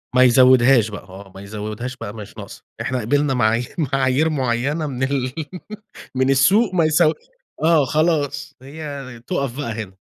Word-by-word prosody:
ما 130 - +6
يزودهاش 125 -2 +5
بقى 105 - -8
آه، 95 +1 -13
ما 95 - -9
يزودهاش 110 +5 -6
بقى 105 -4 -7
ما 110 - -8
هيش 100 - -12
ناقصة، - - -10 0.2
إحنا 130 -1 -2
قبلنا 140 +4 +1
معايير 115 0 0
معايير 135 +1 +1
معينة 140 +3 -1
من 130 -1 -4
ال 130 -2 -1 0.8
من 130 +1 +1
السوء 190 - +3
ما 165 -3 +3
يسـو 155 0 +3 0.5
آه، 160 -4 +4
خلاص 150 -1 0
هي 140 -4 -8
تُقف 135 -2 -2
بقى 140 -6 -3
هنا. 105 -4 -6
130 Hz, 160 wpm, -20 LUFS, 120-145 Hz, 0.8 s, ما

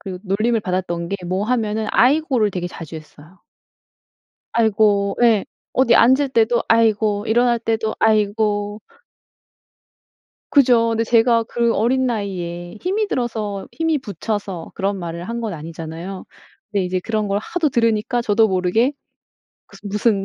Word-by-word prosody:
그 185 -2 -7
놀림을 215 +4 0
받았던 180 -3 -3
게 200 - -1
뭐 185 +3 -1
하면은 220 -2 -1
"아이고."를 255 -4 +3
되게 180 -2 -3
자주 165 -2 -8
했어요. 155 +3 -15 1.1
"아이고." 205 -3 +2
예. 225 -4 +4 0.3
어디 260 - +3
앉을 265 +4 +5
때도 235 -1 +2
"아이고." 220 -2 +2
일어날 240 +1 +2
때도 225 -1 -1
"아이고." 210 -1 +1 1.7
그죠. 240 -5 +4
근데 225 0 0
제가 230 0 +3
그 235 +1 0
어린 255 +4 +1
나이에 180 -5 -4
힘이 415 +4 0
들어서 215 - -3
힘이 325 -2 0
부쳐서 205 -5 -5
그런 195 0 -2
말을 170 +1 -6
한 235 +1 -3
건 210 -6 -3
아니잖아요. 165 +4 -7 0.5
근데 200 -3 0
이제 185 0 -2
그런 215 +1 -2
걸 200 0 0
하도 335 -4 -1
들으니까 230 0 +1
저도 220 0 +3
모르게 190 +8 +1 0.7
그슨 205 - -11
무슨 205 -1 +1
215 Hz, 295 characters per minute, -20 LUFS, 195-235 Hz, 1.7 s, 앉을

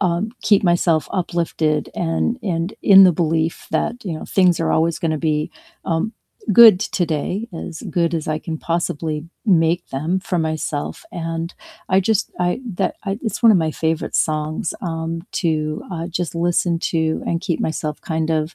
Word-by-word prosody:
um, 180 +3 0
keep 205 -2 +4
myself 170 -2 +2
uplifted, 165 -4 -1
and 175 +8 -1
and 175 -1 -2
in 195 -1 +9
the 180 - +6
belief 160 0 -1
that, 240 -1 -1
you 170 -4 -3
know, - - -7
things 180 -3 +3
are 165 - +1
always 165 +1 +1
gonna 155 -2 -1
be, 155 -1 0 0.3
um, 165 +7 -1 0.4
good 215 -3 +9
today, 180 +2 -1
as 165 -1 -7
good 170 -1 +1
as 160 -2 -2
I 155 - 0
can 160 0 -5
possibly 160 -2 -2 0.2
make 170 -2 +2
them 160 +8 -1
for 185 -2 -2
myself, 155 -2 -3
and 165 0 -4 0.3
I 185 - +4
just 215 +2 0
I 180 +6 0 0.2
that - - -1
I 195 +2 -2
it's 225 0 -3
one 230 - +8
of 195 - +5
my 160 -2 0
favorite 160 +1 -2
songs, 155 0 -1
um, 165 -1 -3
to, 155 -3 -1
uh, 165 -1 -4
just 175 -1 -3
listen 170 0 +1
to, 160 -1 0
and 165 0 0
keep 180 -5 -2
myself 155 -1 -2
kind 160 0 -2
of 155 0 -1
165 Hz, 170 wpm, -20 LUFS, 160-180 Hz, 0.4 s, in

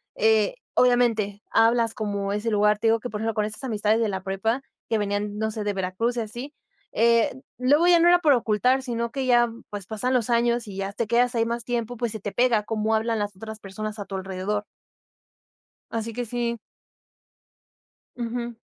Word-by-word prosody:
eh, 220 - +3 0.2
obviamente 230 -5 +2
hablas 230 0 +3
como 200 -2 -2
ese 210 +3 -1
lugar. 210 0 +3
Te 225 - +1
digo, 225 0 +4
que 245 - -6
por 210 - -4
ejemplo, 225 -1 -1
con 210 -1 +1
estas 215 +4 -5
amistades 220 -3 +1
de 225 - +1
la 190 -1 -4
prepa 195 +7 -1 0.3
que 225 - +2
venían, 205 0 -2
no 220 +1 -1
sé, 215 0 -4
de 205 0 -1
Veracruz 195 +6 -1
y - - +1
así, 240 +6 -7 0.4
eh, 230 +1 +3 0.2
luego 290 +6 +4
ya 350 -1 +6
no 335 - +5
era 350 0 +6
por 300 -4 +5
ocultar, 250 +2 +2
sino 235 -2 -3
que 265 0 -2
ya 240 -1 +5 0.2
pues 205 -2 -6
pasan 225 +4 -1
los 245 -2 +1
años 235 0 +2
y 195 -2 -8
ya 195 0 -3
te 230 - -1
quedas 240 +2 +2
ahí 225 -1 +2
más 235 +1 -2
tiempo, 240 -1 -2
pues 235 -1 -1
se 220 - -5
te 205 +1 -5
pega 240 -3 +2
como 220 +1 0
hablan 225 0 0
las 205 -1 -3
otras 220 +2 -8
personas 215 +2 -6
a 205 - -4
tu 195 - -6
alrededor. 190 +2 -3 1.3
Así 230 0 -3
que 245 +2 -3
sí. 235 0 -2 1.6
Ujú. 240 0 -4
225 Hz, 200 wpm, -25 LUFS, 210-240 Hz, 1.6 s, ya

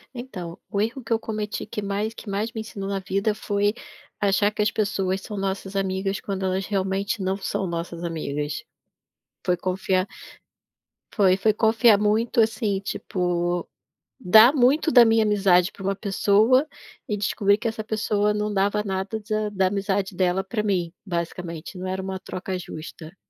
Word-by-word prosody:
Então, 185 -9 -7
o 200 - -2
erro 230 +5 -1
que 225 - -11
eu 225 - +4
cometi 215 -2 -4
que 210 - -5
mais 205 +2 -2
que 225 - -9
mais 205 +3 -1
me 220 - -3
ensinou 195 -2 -6
na 200 0 -1
vida 195 +3 0
foi 205 0 0 0.5
achar 205 +1 +3
que 215 - -2
as 210 - +3
pessoas 195 -3 -1
são 210 - -7
nossas 195 0 -3
amigas 195 0 -1
quando 195 -1 -3
elas 190 +1 -1
realmente 195 +2 -1
não 190 0 0
são 195 0 -2
nossas 170 0 -4
amigas. 150 +2 -3 0.8
Foi 180 -1 +2
confiar 185 +1 0 1.1
foi, 190 -3 +4
foi 215 +2 +3
confiar 220 0 +4
muito, 215 +3 +2
assim, 220 -2 +1
tipo, 175 -2 -2 0.5
dar 220 +3 +7
muito 285 +4 +3
da 245 -4 +8
minha 225 0 +4
amizade 195 -4 +3
pra 195 - -11
uma 195 +1 0
pessoa 215 +7 +3 0.4
e 210 - -1
descobrir 200 0 +2
que 235 +2 -3
essa 220 -1 -3
pessoa 210 -1 0
não 210 0 -1
dava 205 +1 +1
nada 190 +2 -2
da 215 0 0
da 190 -2 +1
amizade 195 0 -1
dela 185 +1 +1
pra 215 +3 -2
mim, 185 -5 0
basicamente 170 -1 -5
não 185 +1 -5
era 190 +1 -2
uma 190 0 -4
troca 185 0 -5
justa. 160 0 -9
200 Hz, 165 wpm, -24 LUFS, 185-215 Hz, 1.1 s, da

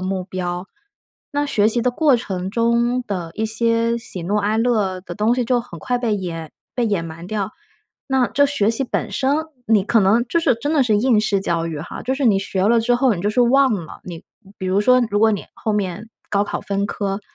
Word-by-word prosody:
目 185 0 -2
标， 180 0 -4 0.6
那 290 0 0
学 215 -8 +2
习 230 +2 +3
的 250 - +2
过 280 +1 +3
程 190 -5 -4
中 235 +2 +1
的 180 -6 -4
一 220 - -2
些 230 +1 +1
喜 185 -5 -5
怒 200 +5 -1
哀 210 +1 +1
乐 215 -6 +1
的 180 - -9
东 215 +3 +2
西 250 -1 0
就 245 +1 +1
很 235 -8 -11
快 245 +7 -1
被 230 -3 0
掩 165 -5 -5 0.2
被 240 -2 +1
掩 200 -6 -1
埋 165 +1 -9
掉。 205 0 -3 0.6
那 265 -3 +1
这 285 0 +3
学 250 -7 +1
习 230 +4 +1
本 - - -3
身， 270 +1 +1 0.3
你 215 -3 +4
可 225 +2 +3
能 210 +5 +3
就 335 - +1
是 330 -6 +2
真 290 +7 -3
的 290 -4 +3
是 220 -4 +2
应 225 0 +3
试 205 -2 +1
教 170 -3 -1
育 160 -3 -5
哈， 160 - -7
就 260 +3 -1
是 275 0 -2
你 205 -4 +4
学 195 -1 -2
了 235 +1 +4
之 240 +2 +2
后， 250 -1 +3
你 175 - -5
就 205 - +1
是 245 - +1
忘 260 +2 +4
了。 170 -5 -7
你 175 -1 -8 0.4
比 190 - -4
如 190 +2 +2
说 255 +4 +5
如 205 - +1
果 220 +1 +4
你 205 - -3
后 220 - -2
面 205 +1 -3 0.2
高 200 0 +2
考 - - -4
分 200 0 -1
科， 200 -1 -3
215 Hz, 250 characters per minute, -20 LUFS, 190-245 Hz, 0.6 s, 说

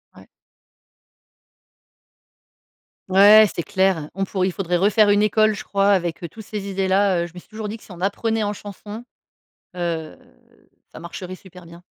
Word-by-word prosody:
Ouais. - - -16 2.8
Ouais, 205 +3 +8
c'est 170 - -3
clair. 190 -5 0
On 195 - -1
pourrait 190 -1 -1
il - - -1
faudrait 180 -2 -1
refaire 205 +2 +3
une 205 0 +4
école, 215 +1 +3
je - - -8
crois, 200 0 +1
avec, 175 -3 0
heu, 170 - -5
tous 220 +6 -11
ces 205 -2 -6
idées 195 0 -1
là, 190 -2 +2
heu. - - -4
Je 170 - -18
me 180 - -9
suis - - -21
toujours 215 -1 -6
dit 210 - -5
que 225 - -14
si - - -15
on 175 - -11
apprenait 220 +3 -1
en 205 - -1
chanson, 205 +2 -9 0.7
heu, 165 -3 -3 0.8
ça - - -11
marcherait 180 +2 -8
super 180 -1 -14
bien. 170 +1 -14
195 Hz, 180 wpm, -21 LUFS, 180-210 Hz, 2.8 s, Ouais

